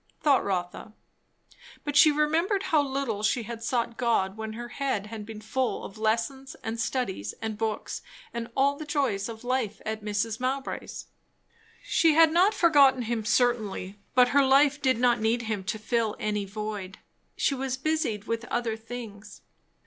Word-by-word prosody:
thought 285 -3 +3
Rotha. 185 +2 -3 0.9
But 290 -1 -3
she 305 +1 +8
remembered 325 +7 +1
how 310 -2 +3
little 270 -6 -2
she 230 +3 +1
had 230 +1 -7
sought 235 -1 -1
God 215 -5 +1
when 220 0 -5
her 240 +2 -7
head 260 -7 -2
had 215 -1 -8
been 220 -1 -8
full 250 +4 -2
of 200 - -10
lessons 230 +5 -1
and 225 +1 -4
studies 225 - -2
and 220 -1 -3
books 220 0 -3 0.3
and 235 0 -4
all 280 +1 +3
the 310 - -6
joys 265 -9 0
of 225 0 -8
life 245 -5 -1
at 220 0 -4
Mrs. 210 +1 -1
Mowbray's. 265 +2 -3 0.8
She 325 -3 +3
had 325 -1 +7
not 365 +6 +4
forgotten 280 -7 +5
him 230 -1 -2
certainly, 215 -5 0 0.2
but 250 -1 +6
her 280 +1 +4
life 280 +2 +4
did 260 -4 +2
not 240 0 +3
need 230 +2 +1
him 215 -3 -3
to 215 - -2
fill 220 0 -1
any 210 -1 -1
void; 205 -1 -5 0.4
she - - +2
was 265 -1 -2
busied 295 - -1
with 230 +1 -3
other 235 -2 -1
things. 220 -2 -9
235 Hz, 165 wpm, -27 LUFS, 215-270 Hz, 0.9 s, she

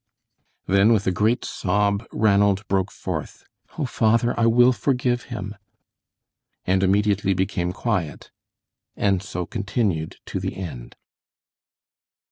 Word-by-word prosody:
Then, 100 +4 +4
with 105 -3 +1
a 95 - +2
great 110 +7 +1
sob, 100 +3 0
Ranald 100 -1 +2
broke 95 0 0
forth: - - -6 0.3
"Oh, 155 - -1
father, 115 -1 +2
I 115 - +2
will 120 +2 +5
forgive 125 -2 0
him," 105 -4 -6 1.1
and 95 +1 +2
immediately 100 0 +2
became 90 -1 -1
quiet, 95 -6 -3 0.6
and 100 -3 +1
so 90 -2 -5
continued 95 -5 -2
to - - -4
the - - -4
end. 80 -11 -7
100 Hz, 115 wpm, -23 LUFS, 95-115 Hz, 1.1 s, will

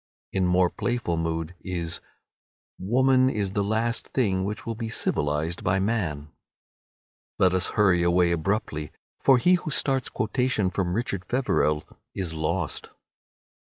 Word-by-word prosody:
In 95 -2 +1
more 90 0 +3
playful 120 -8 -1
mood 80 +1 -2
is 85 -3 -4 0.8
"Woman 130 +6 +3
is 100 -6 -2
the 100 - +1
last 110 +3 -1
thing 95 -8 0
which 105 +3 -4
will 115 - -2
be 115 0 -5
civilized 75 -5 -1
by 90 - +2
man." 90 -9 -1 1.1
Let 90 -1 +4
us 95 -1 +2
hurry 95 -4 +4
away 85 0 +3
abruptly, 85 -3 -1 0.3
for 135 -2 +5
he 175 +9 +4
who - - -4
starts 135 -3 0
quotation 110 -3 0
from 90 -2 -1
"Richard 100 -5 -2
Feverel" 90 - +1 0.3
is 90 -4 -3
lost. 80 +1 -2
95 Hz, 135 wpm, -26 LUFS, 85-115 Hz, 1.1 s, for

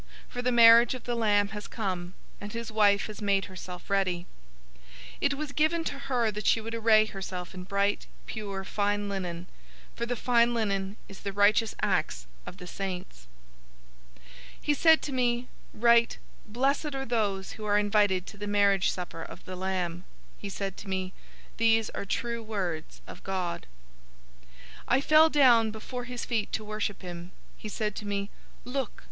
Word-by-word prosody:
For 245 - -5
the 250 0 +1
marriage 235 +1 +7
of 255 - -8
the 245 - -2
Lamb 205 -3 +2
has 210 0 -7
come, 185 -4 -4 0.3
and 205 0 -6
his 230 -1 -5
wife 205 -2 +4
has 215 0 -8
made 200 -2 +2
herself 185 -1 -9
ready." 185 -3 0 0.5
019:008 - - -27 0.4
It - - +2
was 295 0 -5
given 315 +3 +1
to 280 -3 -4
her 250 -5 0
that 210 +1 -4
she - - +5
would 225 +1 -6
array 220 -1 +5
herself 190 -3 -6
in 185 -1 -8
bright, 200 +1 0 0.2
pure, 200 -3 -5
fine 205 +1 -1
linen: 180 -3 -4 0.5
for 235 - -3
the 245 - -1
fine 240 0 +3
linen 200 -2 -1
is 195 - -11
the 200 - -4
righteous 205 +2 +3
acts - - 0 0.2
of 185 - -8
the 180 - -9
saints. 180 - -6 0.9
019:009 60 - -24 0.4
He 295 - +2
said 320 +2 +5
to 290 - -4
me, 245 -1 +1 0.2
"Write, 235 +1 +4 0.3
'Blessed 275 +6 0
are 270 0 -3
those 205 -5 -1
who 215 - -8
are 205 0 +3
invited 205 -3 +2
to 215 - -11
the 205 +1 -5
marriage 200 -2 +3
supper 175 -2 -5
of - - -10
the 185 - -6
Lamb.'" 180 -2 -2 0.4
He 200 - -6
said 195 -1 -4
to 200 - -9
me, 190 0 -2 0.4
"These 225 -1 +3
are - - -5
true 235 +3 -2
words 185 -8 -4
of - - -11
God." 185 -3 -3 0.7
019:010 - - -27 0.4
I 265 +3 +3
fell 310 +2 +6
down 245 -7 +5
before 240 +3 -6
his 245 -1 -5
feet 225 -4 -1
to 220 - -1
worship 210 -2 -3
him. 175 0 -8 0.2
He 215 - -8
said 210 0 -2
to 210 - -5
me, 200 0 -2 0.3
"Look! 255 -1 -3
210 Hz, 175 wpm, -28 LUFS, 190-235 Hz, 0.9 s, marriage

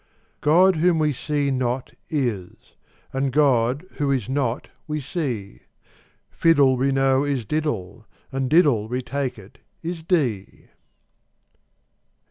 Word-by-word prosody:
God, 175 +4 +5
whom 170 +1 +3
we 155 -2 +2
see 145 +1 -1
not, 125 0 -2 0.2
is: 120 - -3 0.4
and 135 0 0
God, 135 +1 +2
who 145 -2 0
is 130 -7 0
not, 130 -2 -1 0.2
we 150 0 -2
see: 130 - -4 0.7
Fiddle, 145 -6 +4
we 135 +2 +1
know, 135 0 +3
is 140 -5 -1
diddle: 115 - -3 0.2
and 135 -1 -2
diddle, 145 -9 +4
we 125 +3 -2
take 135 0 -3
it, 100 -1 -15 0.2
is 170 0 -4
dee. 135 - -1
135 Hz, 120 wpm, -23 LUFS, 120-150 Hz, 0.7 s, God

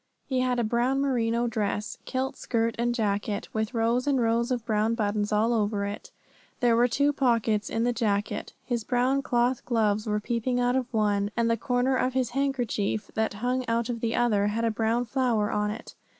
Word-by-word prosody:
He 260 -2 -1
had 255 -1 +1
a 240 - +1
brown 240 +4 +1
merino 240 -4 +1
dress, 210 -2 -2
kilt 260 0 -2
skirt 230 -1 -1
and 240 0 +1
jacket, 205 -2 -1
with 220 +2 -2
rows 235 +3 +1
and 275 -2 +2
rows 235 0 +1
of 245 -3 -2
brown 220 0 +1
buttons 210 -2 -1
all 220 +3 +2
over 205 -2 0
it; 200 +1 -6 0.5
there 240 -2 +3
were 240 +1 +4
two 285 +4 +2
pockets 230 -6 +1
in 225 - -1
the 245 0 +1
jacket; 210 -3 -1
his 235 -3 -2
brown 255 +3 +1
cloth 245 -1 +1
gloves 215 -3 +1
were 210 0 +1
peeping 240 +3 -1
out 245 0 +2
of 255 -1 -1
one, 205 -2 +1
and 230 0 +2
the - - +3
corner 245 +3 +1
of 255 0 0
his 255 -2 0
handkerchief, 245 -6 -1
that 220 -2 -1
hung 255 +1 +1
out 230 +1 0
of 235 -1 -2
the 230 0 -1
other, 210 -4 +2
had 225 +3 -1
a 225 - +2
brown 225 +2 0
flower 235 -4 0
on 210 0 0
it. 220 +3 -7
230 Hz, 200 wpm, -27 LUFS, 215-245 Hz, 0.5 s, were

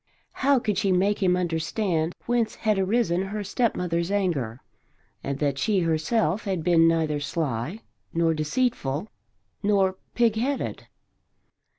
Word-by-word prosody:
How 275 +1 +3
could 210 -6 0
she 195 -2 +1
make 195 +3 +2
him 180 -1 +3
understand 170 0 -1
whence 235 -2 0
had 215 -3 +1
arisen 190 -3 +1
her 205 +2 -3
stepmother's 180 -6 0
anger 160 - -1 0.6
and 140 0 -2
that 140 -2 -1
she 195 +6 +2
herself 165 +4 0
had 190 -5 -1
been 165 -1 +5
neither 160 -3 +1
sly 145 - -3 0.3
nor 165 -1 +2
deceitful 160 - -1 0.5
nor 195 -2 +2 0.2
pigheaded? 240 +4 0
180 Hz, 120 wpm, -25 LUFS, 160-210 Hz, 0.6 s, been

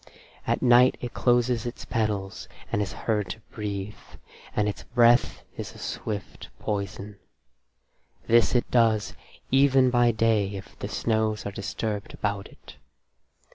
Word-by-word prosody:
At - - 0
night 125 +1 +6
it 120 - -6
closes 120 -1 +2
its 120 - -7
petals 105 -4 -2 0.2
and 105 - +1
is 100 - -2
heard 105 -4 -2
to 110 - -6
breathe, 105 -1 -4 0.6
and 105 0 +2
its 105 - -3
breath 120 0 +3
is - - -7
a - - -11
swift 105 -2 -6
poison. 100 0 -4 1.1
This 120 +2 +4
it 120 - +1
does 115 -3 +3 0.4
even 135 -1 +5
by 120 0 +4
day 110 -3 +1
if 95 - -9
the - - -4
snows 110 -2 0
are 100 - -3
disturbed 100 +1 -4
about 100 -1 -2
it. - - -16
110 Hz, 135 wpm, -26 LUFS, 100-120 Hz, 1.1 s, night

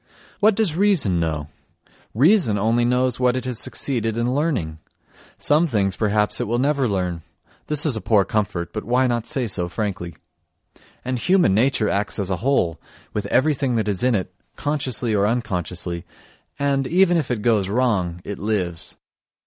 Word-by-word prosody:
What 215 0 +4
does 210 -7 +1
reason 170 - +2
know? 80 -3 -2 0.7
Reason 150 - +4
only 115 +4 +2
knows 125 0 +1
what 125 0 +2
it 130 - -4
has 125 -3 -2
succeeded 115 -5 -1
in 120 +2 0
learning 125 - -1 0.6
(some 155 +4 +3
things, 100 - 0
perhaps, 105 -1 0
it - - -2
will 120 +3 0
never 140 0 +1
learn; 90 -5 -2 0.5
this 150 0 +3
is 145 -6 +2
a 110 - -3
poor 105 -4 +3
comfort, 100 -6 -2
but - - -4
why 125 +3 +2
not 120 -2 -1
say 130 -3 -1
so 90 -4 -2
frankly?) 90 -5 -4 0.9
and 130 -1 -2
human 180 - +3
nature 115 0 +2
acts 100 +1 -1
as 100 -2 -2
a 95 - 0
whole, 90 - 0 0.3
with - - -3
everything 135 -3 +1
that 110 -2 0
is 100 -3 -1
in 125 -2 +2
it, 95 - -3 0.2
consciously 130 -6 -2
or 100 -1 +2
unconsciously, 90 -6 -3 0.5
and, 140 -2 0
even 175 +2 +3
if 160 - 0
it 115 -4 -2
goes 105 -5 +2
wrong, 100 -7 0
it 100 - -6
lives. 95 -6 -3
115 Hz, 170 wpm, -22 LUFS, 95-135 Hz, 0.9 s, What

